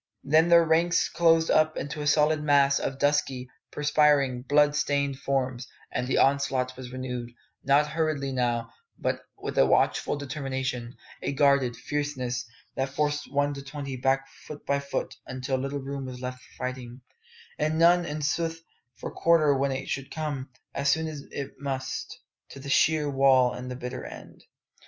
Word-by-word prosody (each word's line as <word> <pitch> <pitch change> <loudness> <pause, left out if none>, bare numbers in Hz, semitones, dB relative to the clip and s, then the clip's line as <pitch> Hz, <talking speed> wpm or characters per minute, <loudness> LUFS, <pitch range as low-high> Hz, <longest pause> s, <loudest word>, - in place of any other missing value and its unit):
Then 160 +4 +4
their 170 -1 +7
ranks 165 +2 +3
closed 165 -1 +3
up 155 0 +3
into 145 +1 -4
a 145 - -2
solid 150 +1 +3
mass 140 -2 +4
of 135 - -3
dusky, 135 -3 0 0.2
perspiring, 145 -3 +3
blood 145 +2 +3
stained 140 -2 0
forms, 130 -2 -1 0.2
and 125 0 -2
the 130 - +1
onslaught 135 -2 +2
was 125 -1 -9
renewed 125 -2 -5 0.3
not 140 +2 +4
hurriedly 150 -3 -1
now, 120 -2 -1 0.3
but - - -2 0.2
with - - -3
a - - +7
watchful - - +2
determination, 130 -3 -4 0.3
a - - -2
guarded, 140 -3 +3
fierceness, 130 -5 -3 0.3
that 135 0 -1
forced 150 +1 -1
One 145 +1 +1
to 140 - -7
twenty 140 -1 -6
back 135 +2 +1 0.2
foot 150 - -9
by 140 0 +1
foot 140 0 -4
until 130 +1 -2
but - - -3
little 140 +1 -3
room 135 0 -5
was 125 -1 -7
left 125 0 -6
for - - -20
fighting, 125 0 -6 0.6
and 155 +1 +1
none, 175 +2 +5
in 150 -2 -4
sooth, 165 +3 -1 0.4
for - - -7
quarter 155 -4 +3
when 135 +1 +1
it 135 0 -4
should 135 0 -3
come, 145 -4 -4 0.2
as 140 - 0
soon 155 -1 -1
it 140 -1 -6
must, 135 -2 -4 0.3
to - - -10
the 140 +1 -8
sheer 155 +2 +3
wall 135 -2 +4
and 125 0 -7
the 125 - -5
bitter 125 0 -6
end. - - -11
140 Hz, 170 wpm, -27 LUFS, 130-150 Hz, 0.6 s, their